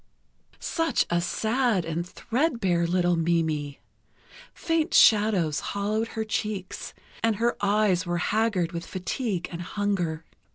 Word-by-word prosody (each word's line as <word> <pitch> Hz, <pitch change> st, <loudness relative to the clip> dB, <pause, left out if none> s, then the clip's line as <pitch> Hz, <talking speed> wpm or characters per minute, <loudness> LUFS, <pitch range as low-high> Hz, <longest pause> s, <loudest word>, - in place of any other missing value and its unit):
Such 330 Hz, -1 st, 0 dB
a 175 Hz, 0 st, +2 dB
sad 220 Hz, 0 st, 0 dB
and 170 Hz, +2 st, -3 dB
thread 255 Hz, -, -1 dB
bare 175 Hz, -4 st, +1 dB
little 175 Hz, 0 st, +2 dB
Mimi... 160 Hz, -4 st, -1 dB, 0.7 s
faint 325 Hz, -2 st, -1 dB
shadows 205 Hz, -8 st, +5 dB
hollowed 210 Hz, +3 st, -2 dB
her 220 Hz, -, +1 dB
cheeks, 210 Hz, -3 st, -4 dB, 0.3 s
and 225 Hz, -1 st, +2 dB
her 235 Hz, +3 st, +1 dB
eyes 200 Hz, -3 st, +3 dB
were 175 Hz, 0 st, 0 dB
haggard 200 Hz, -2 st, +1 dB
with 170 Hz, 0 st, -5 dB
fatigue 185 Hz, +1 st, -3 dB
and 170 Hz, 0 st, -5 dB
hunger. 180 Hz, -4 st, -2 dB
190 Hz, 125 wpm, -26 LUFS, 170-220 Hz, 0.7 s, shadows